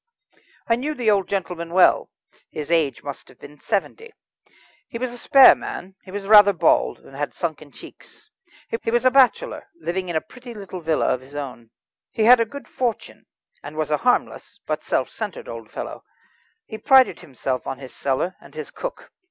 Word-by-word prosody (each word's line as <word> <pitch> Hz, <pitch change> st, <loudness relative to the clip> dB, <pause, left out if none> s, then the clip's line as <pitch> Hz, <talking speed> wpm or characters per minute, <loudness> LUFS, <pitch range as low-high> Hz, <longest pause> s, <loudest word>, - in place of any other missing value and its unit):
I 230 Hz, -, +3 dB
knew 300 Hz, +5 st, -3 dB
the 235 Hz, -5 st, +2 dB
old 195 Hz, -3 st, +1 dB
gentleman 175 Hz, -3 st, -3 dB
well. 185 Hz, -, +4 dB, 0.4 s
His 150 Hz, +1 st, -6 dB
age 160 Hz, -5 st, +1 dB
must 140 Hz, -1 st, -7 dB
have -, -, -18 dB
been 145 Hz, 0 st, -14 dB
seventy. 440 Hz, -, -3 dB, 0.8 s
He 230 Hz, -, -6 dB
was 245 Hz, 0 st, -3 dB
a -, -, -9 dB
spare 270 Hz, +1 st, +8 dB
man, 190 Hz, +2 st, -7 dB
he -, -, -15 dB
was 200 Hz, +1 st, -6 dB
rather 205 Hz, -1 st, +8 dB
bald, 170 Hz, -2 st, +2 dB
and 135 Hz, -, -15 dB
had 145 Hz, +1 st, -4 dB
sunken 155 Hz, -3 st, -4 dB
cheeks. 430 Hz, -, -15 dB, 0.5 s
He -, -, -2 dB
was 240 Hz, +2 st, +1 dB
a 255 Hz, -, +6 dB
bachelor, 275 Hz, -, +2 dB
living 185 Hz, -, -3 dB
in 170 Hz, -, -3 dB
a 160 Hz, -, +1 dB
pretty 245 Hz, +6 st, -12 dB
little 190 Hz, -3 st, -8 dB
villa 160 Hz, -1 st, 0 dB
of 125 Hz, -, -4 dB
his 135 Hz, +3 st, -15 dB
own. 125 Hz, -5 st, -7 dB, 0.4 s
He 220 Hz, -, -1 dB
had 240 Hz, +2 st, +8 dB
a 230 Hz, -, +2 dB
good 280 Hz, +5 st, -10 dB
fortune, 240 Hz, -4 st, -4 dB, 0.3 s
and 150 Hz, +2 st, -9 dB
was 155 Hz, -1 st, -2 dB
a 150 Hz, -, +3 dB
harmless, 245 Hz, +6 st, -1 dB
but -, -, -3 dB
self -, -, -1 dB
centred, -, -, -6 dB
old -, -, -8 dB
fellow. -, -, -7 dB, 0.6 s
He 220 Hz, -, -8 dB
prided 265 Hz, +2 st, +5 dB
himself 130 Hz, -1 st, -4 dB
on 135 Hz, -, -4 dB
his 130 Hz, -1 st, -11 dB
cellar 140 Hz, +7 st, -1 dB
and 140 Hz, +2 st, -17 dB
his 155 Hz, -2 st, -7 dB
cook. -, -, -7 dB
190 Hz, 190 wpm, -22 LUFS, 150-245 Hz, 0.8 s, spare